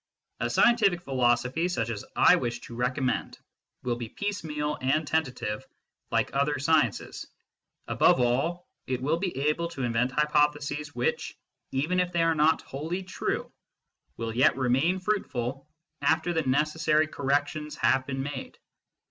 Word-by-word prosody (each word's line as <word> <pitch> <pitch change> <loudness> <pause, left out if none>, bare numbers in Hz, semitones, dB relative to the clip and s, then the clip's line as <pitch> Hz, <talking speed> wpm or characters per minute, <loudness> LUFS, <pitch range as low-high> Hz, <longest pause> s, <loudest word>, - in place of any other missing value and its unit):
A - - -1
scientific 215 -7 +4
philosophy 130 +3 +1
such 120 -11 -1
as 105 - -5
I - - +6
wish 120 0 -3
to - - -10
recommend 125 +1 -1 0.5
will 120 -1 -1
be 120 -2 -6
piecemeal 150 - -3
and 145 +4 +1
tentative 125 -9 -1 0.5
like - - 0
other 140 +1 +1
sciences; 140 -5 0 0.6
above - - +4
all, 135 +9 0 0.2
it 130 -1 -1
will 145 +5 0
be 180 -5 -3
able 150 +4 +1
to 170 -6 -6
invent 120 +1 +1
hypotheses 150 0 0
which, 120 0 -2 0.3
even 155 +7 0
if 180 -1 +1
they 170 -1 +2
are 165 0 +3
not 155 +1 +3
wholly 160 +7 -4
true, 185 - -3 0.7
will 115 -1 -4
yet 130 +2 +4
remain 135 +8 +2
fruitful 140 - -2 0.3
after 165 +2 +2
the 165 - +1
necessary 155 +2 +2
corrections 145 +1 -1
have 130 0 +2
been 135 -1 -3
made. 140 -2 -6
145 Hz, 140 wpm, -27 LUFS, 130-160 Hz, 0.7 s, I